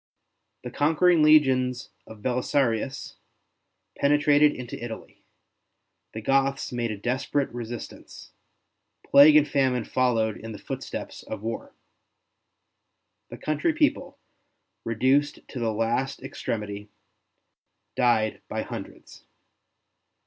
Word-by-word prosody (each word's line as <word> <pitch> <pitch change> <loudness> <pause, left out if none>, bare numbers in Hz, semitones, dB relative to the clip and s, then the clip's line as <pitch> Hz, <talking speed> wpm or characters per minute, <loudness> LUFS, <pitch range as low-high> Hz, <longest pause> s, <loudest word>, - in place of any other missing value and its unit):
The - - -6
conquering 160 +3 +3
legions 130 -5 +3 0.2
of 110 -2 -13
Belisarius 125 0 -1 0.8
penetrated 145 +1 +4
into 125 -3 -8
Italy; 115 -2 -9 0.9
the 110 - -6
Goths 135 +2 +1
made 120 -1 -2
a 105 - -4
desperate 130 +5 -2
resistance; 120 -1 -8 0.7
plague 145 +2 +7
and 150 -1 +6
famine 130 -4 +1
followed 115 -4 0
in 110 0 -8
the - - -8
footsteps 100 - -7
of 100 - -8
war. 115 0 -5 1.5
The - - -9
country 155 - -1
people, 305 -2 0 0.7
reduced 130 +6 +1
to 130 - -6
the 115 -2 0
last 115 +5 -2
extremity, 105 -2 -5 1.1
died 110 -3 +1
by - - -3
hundreds. - - -10
125 Hz, 100 wpm, -25 LUFS, 115-145 Hz, 1.5 s, plague